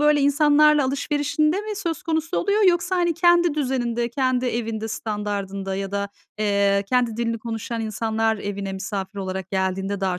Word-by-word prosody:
böyle, 295 0 +4
insanlarla 295 +1 +4
alışverişinde 290 +5 0
mi 425 0 -5
söz 340 -6 -3
konusu 320 0 -1
oluyor 410 +3 +2
yoksa, 350 +1 +1
hani, 345 -1 +1
kendi 345 -1 +4
düzeninde, 245 -4 -1
kendi 255 0 0
evinde 225 -2 -2
standardında 200 -3 -3
ya 195 0 -4
da, 200 0 -1 0.3
eee, 200 -1 +2
kendi 245 -3 +1
dilini 230 -1 -1
konuşan 230 0 -4
insanlar 220 0 0
evine 200 -1 -4
misafir 195 0 -5
olarak 190 -1 -4
geldiğinde 190 +1 -1
daha 185 -2 0
230 Hz, 155 wpm, -23 LUFS, 200-300 Hz, 0.3 s, böyle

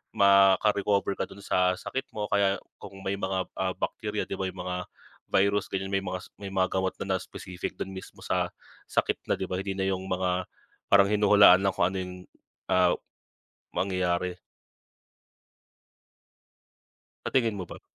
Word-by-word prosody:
maka-recover 100 +1 +4
ka - - -1
dun 100 0 -12
sa 90 -1 +2
sakit 135 +7 -4
mo, 105 -1 -1
kaya 100 -1 +3 0.2
kung 95 - -10
may 95 +1 -1
mga, 95 -2 -1
ah, 95 -1 +1
bakterya 105 +3 -2
'di - - -3
ba, 95 - 0
yung 90 - -13
mga 90 0 -3 0.5
virus 100 +1 +2
ganyan 95 0 -2
may 95 - +2
mga 90 -1 -3
s - - -14
may 100 -1 -6
mga 95 -1 +2
gamot 95 0 0
na 95 -1 0
na - - +1
specific 90 -1 -7
dun 95 - -4
mismo 95 - -10
sa - - 0 0.4
sakit - - 0
na - - +3
'di 95 - -1
ba, 90 - -3
hindi 95 0 -3
na - - +1
yung 95 -1 -1
mga 90 0 0 0.5
parang 100 -1 +7
hinuhulaan 100 -3 +7
lang 100 -1 +1
kung 85 - +3
ano 95 - -4
yung, 90 0 -6 0.6
ah, - - +4 0.8
mangyayari. 90 -1 -1 2.8
Sa - - -1
tingin 115 -5 +3
mo 90 - -4
ba? - - -9
95 Hz, 165 wpm, -28 LUFS, 95-100 Hz, 2.8 s, parang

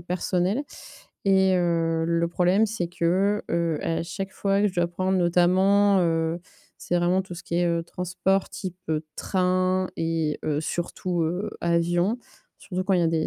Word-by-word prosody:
personnelles. 180 - 0 0.6
Et, 190 -1 +4
heu, 165 -2 +1
le 170 0 +1
problème, 180 +5 +3
c'est 205 -5 -3
que, 185 +4 +1
heu, 170 -2 0
à 165 0 -1
chaque 190 +3 -5
fois 195 0 +1
que 210 - +4
je 185 - -9
dois 175 -1 +3
prendre 185 +2 0
notamment, 185 +3 +4
heu, 165 0 0 0.4
c'est 175 - -1
vraiment 175 +2 +2
tout 185 -1 -9
ce 175 - -9
qui 170 - -3
est, 175 0 +2
heu, 170 -1 0
transport 180 +2 -1
type, 185 -3 -6
heu, 155 0 -1
train 185 0 +1
et 165 -2 -1
heu, 150 -1 0
surtout, 175 +2 -2
heu, 180 +6 -2
avion 175 +5 +1 0.4
surtout 185 -1 -4
quand 195 - +1
il 180 - +3
y - - +2
a - - +3
des 160 -1 0
175 Hz, 175 wpm, -25 LUFS, 170-190 Hz, 0.6 s, Et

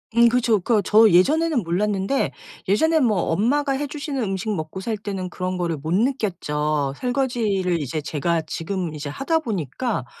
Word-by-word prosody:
음 235 0 +6
그렇죠.그거 230 -3 +2
저 215 +2 +6
예전에는 290 - +3
몰랐는데 195 +7 0 0.4
예전엔 315 - +3
뭐 215 -4 +2
엄마가 275 - +1
해 285 +2 -2
주시는 290 -2 -4
음식 205 +1 -2
먹고 155 +1 -5
살 220 +3 -2
때는 195 -3 -5
그런 185 0 -3
거를 170 -2 -1
못 155 +3 -5
느꼈죠. 155 - 0
설거지를 225 - 0
이제 150 +3 -3
제가 160 +3 -1
지금 170 +1 -4
이제 145 -1 -5
하다 300 - 0
보니까 210 - -3
200 Hz, 340 characters per minute, -22 LUFS, 170-250 Hz, 0.4 s, 음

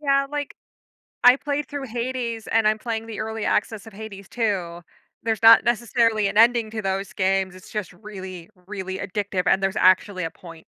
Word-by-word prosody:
Yeah, 275 -1 +2
like, 290 -1 -4 0.7
I 250 +1 +8
played 285 0 -3
through 285 -2 -5
Hades 235 -1 -4
and 225 -1 +2
I'm 215 0 +2
playing 225 0 -4
the 225 - -7
early 220 0 -4
access 210 0 -1
of 220 - -12
Hades 200 -2 -9
II- 190 -7 -1 0.4
there's 225 -3 -1
not 230 0 +8
necessarily 230 -2 +1
an 200 +1 -3
ending 230 0 +5
to 220 0 -5
those 195 +1 -2
games, 190 -2 0
it's 185 - -14
just 210 -5 -4
really, 185 -3 -9 0.2
really 190 -2 -5
addictive, 200 -1 -2
and 190 - +3
there's 195 +1 0
actually 185 0 +3
a 165 - -2
point. 165 -1 -14
215 Hz, 185 wpm, -23 LUFS, 190-230 Hz, 0.7 s, I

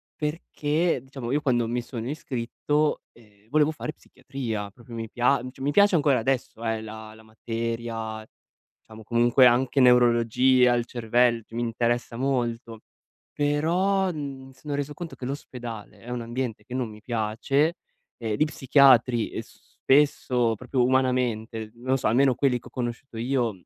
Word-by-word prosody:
perché 155 +1 -1
diciamo 130 -2 -7
io 150 - +1
quando 120 -5 +1
mi 120 +1 -1
sono 120 -1 -6
iscritto, 145 +2 -1
ehm, 105 -2 -23
volevo 150 +2 +3
fare 155 -1 -6
psichiatria, 115 -10 -6
proprio 115 +3 -15
mi 115 -1 -5
pia 125 +2 +2
mhmm, 130 - -6
cioè 135 - -15
mi 140 +2 0
piace 200 +3 +5
ancora 145 -4 +3
adesso, 120 -1 -2
ehm, 110 -1 -1
la 110 0 -9
la 110 - -16
materia, 115 0 -4 0.6
diciamo 110 0 -12
comunque, 120 +3 +4
anche 125 +3 +2
neurologia, 125 0 +5
il 120 -1 0
cervel 120 -1 +1
mi 115 +1 -3
interessa 120 0 -1
molto; 120 -4 -2 0.5
però 175 +7 +1
n 135 -4 -7
sono 145 +3 -7
reso 145 +1 -3
conto 170 -1 -8
che 125 - -7
l'ospedale 120 -6 -7
è 120 +5 -12
un 125 -1 -3
ambiente 120 -2 -4
che 125 - -10
non 125 -3 -2
mi 105 0 -12
piace, 120 +8 0 0.4
ehm, 110 -3 -2
gli 155 - +3
psichiatri, 130 -5 +4
ehm, - - -4
s - - -21
spesso, 125 -4 +3
proprio 125 +3 -1
umanamente, 125 -4 0
non 130 +3 0
so, - - 0
almeno 130 +3 +4
quelli 130 -1 +2
che - - -24
ho - - -12
conosciuto 120 0 -5
io, 120 0 0
125 Hz, 160 wpm, -25 LUFS, 115-135 Hz, 0.6 s, piace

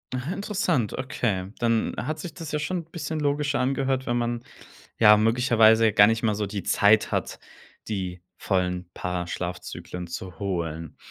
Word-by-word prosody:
Ah, 130 +6 -3
interessant. 185 - 0
Okay, 105 -8 -2
dann 115 -1 +1
hat 155 0 -3
sich 175 -4 -7
das 160 -3 -7
ja 150 - +1
schon 180 +5 -2
'n 170 - -5
bisschen 160 -1 -4
logischer 145 -1 0
angehört, 135 0 0
wenn 120 - 0
man, 120 0 -1 0.6
ja, 105 -1 +8
möglicherweise 115 0 +4
ja 110 - +5
gar 100 +1 +7
nicht 115 +1 0
mal 110 -2 +2
so 105 0 -2
die 100 -1 -5
Zeit 105 +1 +4
hat, - - -2 0.5
die 95 -4 -4 0.2
vollen 90 -2 -1
paar 90 -1 -3
Schlafzyklen 90 0 -5
zu 90 +1 -7
holen. 85 -5 -3
110 Hz, 170 wpm, -25 LUFS, 95-135 Hz, 0.6 s, ja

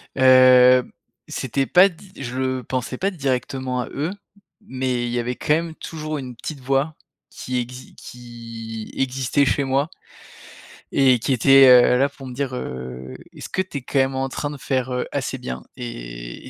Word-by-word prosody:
Heu, 130 -1 +7 0.4
c'était 135 +1 -2
pas 180 +7 +6
di 190 +2 -16
je 125 -1 -5
le 130 -1 -1
pensais 125 +1 -3
pas 195 +6 0
directement 130 -4 -2
à - - -6
eux, 150 +5 -3 0.5
mais 130 - -2
il - - -3
y 120 - -1
avait, 125 +1 -2
quand 150 - +1
même, 165 0 -1
toujours, 155 -2 -5
une 130 -3 -7
petite 145 +5 -7
voix 135 +4 0 0.3
qui 130 0 -5
exi 125 +1 -6
qui 115 -2 -9
existait 135 +1 +1
chez 135 +3 +1
moi 135 +3 0 1.0
et 130 -3 +4
qui 130 - 0
était, 135 +2 +7
heu, 125 0 +7
là 135 +2 +3
pour 140 -1 -13
me 125 - -7
dire, 135 0 -3
heu: 65 - -6 0.2
«Est-ce - - -9
que 185 - 0
tu 185 -6 -6
es, - - -15
quand 135 +2 -1
même, 135 0 +1
en 135 0 -1
train 145 +2 -3
de 145 - -7
faire, 130 -2 -2
heu, 125 - -1
assez - - -3
bien?» 65 0 -6
et - - -8
et - - -9
130 Hz, 185 wpm, -22 LUFS, 120-140 Hz, 1.0 s, Heu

